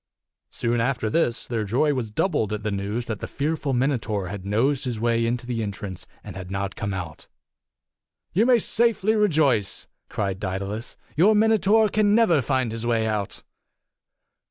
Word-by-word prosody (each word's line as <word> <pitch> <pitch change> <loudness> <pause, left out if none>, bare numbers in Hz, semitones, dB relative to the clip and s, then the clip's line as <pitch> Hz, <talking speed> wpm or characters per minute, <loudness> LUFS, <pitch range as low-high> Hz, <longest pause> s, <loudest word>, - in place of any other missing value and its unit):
Soon 120 0 -1
after 115 -3 0
this 125 -6 +1
their 115 -3 -2
joy 130 +9 +1
was 125 -5 -3
doubled 110 - 0
at 105 0 -4
the 105 - -1
news 100 +4 -2
that 110 -4 -4
the - - -5
fearful 150 0 -2
Minotaur 120 -7 0
had 100 -1 -6
nosed 125 +7 +1
his 120 -4 -3
way 115 0 +1
into 120 +1 -2
the 120 -2 -2
entrance 100 -3 -5 0.2
and - - -9
had 95 -1 -7
not 100 0 -3
come 100 -1 -3
out. 90 -5 -6 1.1
"You 215 +8 +3
may 250 -2 +6
safely 220 -1 +2
rejoice," 150 - +2 0.2
cried 95 -3 -2
Daedalus. 100 +3 -4 0.2
"Your 200 +8 +5
Minotaur 220 0 +4
can 210 0 +2
never 180 -10 +4
find 130 -1 0
his 115 0 -4
way 115 -2 +1
out." 105 -2 -3
120 Hz, 165 wpm, -24 LUFS, 105-155 Hz, 1.1 s, may